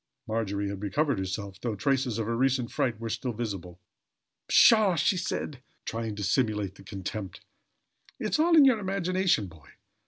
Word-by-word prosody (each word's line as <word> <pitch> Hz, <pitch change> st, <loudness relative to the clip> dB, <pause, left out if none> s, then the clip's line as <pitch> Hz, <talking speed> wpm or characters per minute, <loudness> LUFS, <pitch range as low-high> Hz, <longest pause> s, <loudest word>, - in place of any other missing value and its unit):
Margery 100 Hz, -2 st, -2 dB
had 100 Hz, -1 st, -6 dB
recovered 140 Hz, +4 st, 0 dB
herself, 95 Hz, +1 st, -5 dB
though 115 Hz, -3 st, -2 dB
traces 130 Hz, +1 st, 0 dB
of 115 Hz, -, -1 dB
her 115 Hz, +1 st, -1 dB
recent 130 Hz, -1 st, +1 dB
fright 115 Hz, -4 st, -1 dB
were 115 Hz, -, -4 dB
still 120 Hz, +3 st, -3 dB
visible. 100 Hz, -6 st, -5 dB, 0.7 s
"Pshaw!" 215 Hz, -5 st, +6 dB
she 170 Hz, -, +2 dB
cried, 135 Hz, -4 st, -4 dB, 0.2 s
trying 115 Hz, -2 st, -4 dB
to 105 Hz, -, -5 dB
simulate 105 Hz, -3 st, -1 dB
contempt. 95 Hz, -1 st, -6 dB, 0.8 s
"It's -, -, -1 dB
all 330 Hz, +1 st, +5 dB
in 290 Hz, -, +8 dB
your 255 Hz, -5 st, +4 dB
imagination, 185 Hz, -, 0 dB
boy. 80 Hz, -5 st, -15 dB
115 Hz, 155 wpm, -28 LUFS, 100-140 Hz, 0.8 s, in